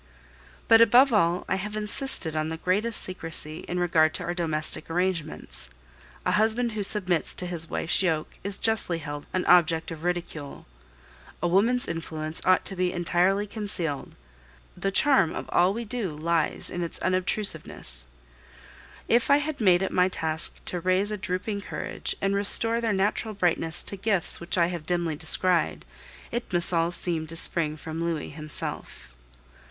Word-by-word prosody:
But, 225 0 +7
above 245 +3 +6
all, 175 -4 +2
I 190 - 0
have 210 +2 -5
insisted 210 - -1
on 155 0 0
the 160 0 -4
greatest 205 +7 -1
secrecy 165 -3 -5
in 180 - -3
regard 160 -3 +3
to - - -2
our 175 - -2
domestic 155 -2 -2
arrangements. 165 - -3 0.6
A - - +2
husband 220 +4 +2
who 215 -1 -3
submits 185 -5 0
to 180 - -2
his 170 -2 -3
wife's 165 - 0
yoke 160 -5 -1
is 200 0 0
justly 220 -6 +1
held 145 -2 -7
an 185 - -1
object 165 -2 +4
of 160 -1 -8
ridicule. 170 -5 -4 0.7
A 175 - 0
woman's 225 +8 +2
influence 160 -1 -5
ought 185 0 +4
to 195 - -2
be 180 -1 0
entirely 180 +3 +1
concealed. 200 -9 -4 0.6
The 195 - -1
charm 255 - +3
of - - -5
all 180 +2 +3
we 230 +3 -4
do 220 -3 -2
lies 160 +1 0
in 175 - -3
its 170 - -2
unobtrusiveness. 185 - -1 1.0
If 235 +1 +2
I 280 - +7
have 295 -2 -3
made 185 -3 +4
it 190 - -2
my 180 0 +3
task 160 -2 -2
to 180 - -3
raise 185 +4 +1
a 210 - -2
drooping 200 +1 -3
courage - - -4
and 195 0 0
restore 225 +3 +4
their 225 -1 0
natural 205 +2 0
brightness 165 -4 0
to 200 - -5
gifts 195 -3 0
which 170 +2 -2
I 170 - +5
have 170 -2 -5
dimly 175 -3 0
descried, 170 +3 +1 0.5
it 240 +1 -4
must 175 0 +3
all 165 0 +2
seem 170 -2 0
to 165 - -8
spring 160 -2 +1
from 160 +2 -5
Louis 165 -3 -3
himself. 145 - -5
180 Hz, 165 wpm, -26 LUFS, 165-205 Hz, 1.0 s, But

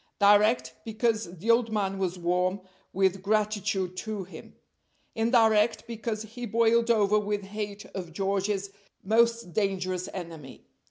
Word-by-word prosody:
Direct, 205 +3 +4
because 220 -5 -1
the 220 +8 +2
old 230 -1 +2
man 195 -2 -1
was 185 -1 -1
warm 180 +2 0 0.3
with 190 0 +1
gratitude 205 -3 0
to 215 -1 -4
him; 185 - -12 0.6
indirect, 225 -1 +3
because 225 -2 -4
he 235 +3 -7
boiled 230 +1 +3
over 210 -2 +4
with 205 -1 -2
hate 205 0 -6
of 180 -3 -6
George's 195 +2 -1 0.3
most 230 -2 +2
dangerous 185 -3 -1
enemy. 165 -7 -9
205 Hz, 125 wpm, -27 LUFS, 190-220 Hz, 0.6 s, Direct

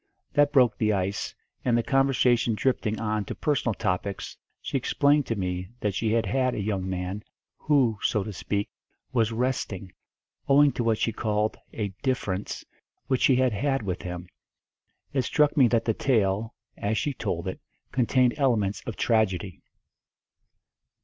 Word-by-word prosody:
That 145 0 +4
broke 125 -6 +4
the 110 -1 +2
ice, 95 0 -2 0.3
and 120 -2 +2
the 120 - +1
conversation 125 -4 +3
drifting 110 -3 0
on 110 -1 -1
to - - -5
personal 135 -7 0
topics 100 -1 -2 0.2
she - - -5
explained 145 0 +2
to 115 - -1
me 90 -2 -3
that 105 -2 -1
she 110 +4 0
had 115 0 +2 0.3
a - - -3
young 100 -2 -2
man, 95 +3 -3 0.4
who, 130 -8 +2
so 105 - +1
to 105 - -6
speak, 100 +2 -2 0.5
was 115 -3 +2
"resting," 115 -6 -2 0.6
owing 145 +1 +6
to 120 - -2
what 115 -1 +2
she 115 - 0
called 105 -1 0 0.2
a 105 -3 -3
"difference" 105 -8 -2 0.4
which 130 -2 0
she 130 - +5
had 130 -2 +2
had 135 +4 0
with 95 -3 -3
him. 90 0 -6 0.9
It 135 - +2
struck 150 +4 +2
me 135 -5 +6
that 115 -1 +1
the 115 - +2
tale, 110 -3 +1 0.2
as 105 +2 -1
she 145 +6 -1
told 85 -7 -3
it, 95 - -4 0.3
contained 125 -1 +3
elements 110 -8 +1
of 115 - -3
tragedy. 100 -5 0
110 Hz, 155 wpm, -26 LUFS, 100-130 Hz, 0.9 s, owing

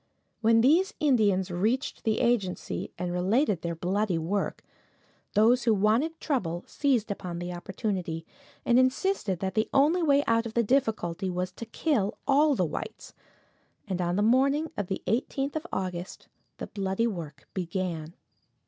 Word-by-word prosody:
When 225 0 +5
these 345 - +3
Indians 205 -10 +2
reached 220 +10 -1
the 220 -1 +1
agency, 235 -7 -1
and 175 0 -3
related 195 - +1
their 170 -1 -3
bloody 185 +2 0
work, 185 +5 -2 0.7
those 235 +4 +4
who 225 -2 +4
wanted 230 +11 +1
trouble 180 - -2
seized 250 -7 0
upon 180 -3 -5
the 175 +1 -4
opportunity, 175 -2 -3 0.4
and 245 0 +5
insisted 255 - +1
that 190 -1 -2
the 220 0 0
only 305 +6 +4
way 285 -3 +4
out 230 0 +2
of 225 - -10
the 235 - +3
difficulty 210 -7 0
was 180 0 -2
to 225 +5 -9
kill 225 -5 0
all 290 +1 +4
the 185 - +1
whites, 155 - -6 0.7
and 185 -2 -2
on 175 0 0
the 205 - +2
morning 275 +7 +3
of 205 - -3
the 190 - -4
18th 270 +5 -1
of 315 +3 -3
August 180 -1 -4 0.3
the - - -5
bloody 195 +2 -1
work 160 -10 -5
began. 170 -3 -3
210 Hz, 155 wpm, -28 LUFS, 180-255 Hz, 0.7 s, When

